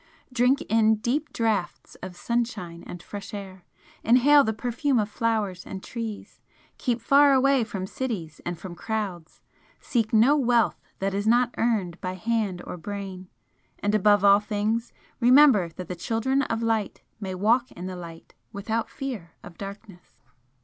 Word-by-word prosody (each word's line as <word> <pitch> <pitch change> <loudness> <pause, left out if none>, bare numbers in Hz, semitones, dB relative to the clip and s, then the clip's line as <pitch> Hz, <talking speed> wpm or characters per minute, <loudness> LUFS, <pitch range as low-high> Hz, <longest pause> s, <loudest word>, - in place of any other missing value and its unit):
Drink 250 +4 +3
in 220 0 +3
deep 255 +8 -2
draughts 215 -6 -2
of 185 -1 -7
sunshine 195 -5 -3
and 175 -1 -9
fresh 205 0 -8
air, 190 -2 -9 0.4
inhale 275 +5 +6
the 220 - 0
perfume 250 +5 -1
of 210 -1 0
flowers 210 -6 -1
and 190 -1 -8
trees, 225 -3 -7 0.4
keep 240 -2 0
far 280 +4 +5
away 270 -1 +4
from 200 -4 -5
cities 190 - -5
and 175 0 -4
from 175 +1 -8
crowds 195 -5 -5 0.4
seek 225 -3 -1
no 230 +6 +5
wealth 240 -5 +2 0.2
that 195 0 -2
is 200 +2 -1
not 240 +1 +3
earned 205 -7 0
by 185 -1 -3
hand 210 -3 -2
or - - -6
brain 190 0 -7 0.5
and 205 +1 -1
above 205 -1 +4
all 200 0 +7
things 215 +2 -2 0.3
remember 250 - +6
that 180 +2 -9
the 180 - -5
Children 230 +9 0
of 230 -4 -2
Light 225 -3 -1 0.2
may 190 -3 -4
walk 230 +6 +2
in 175 - -8
the 185 0 -5
Light 170 -2 -10 0.2
without 220 +3 -3
fear 240 - -6
of 175 - -11
darkness!" 195 -4 -11
215 Hz, 155 wpm, -25 LUFS, 185-235 Hz, 0.5 s, all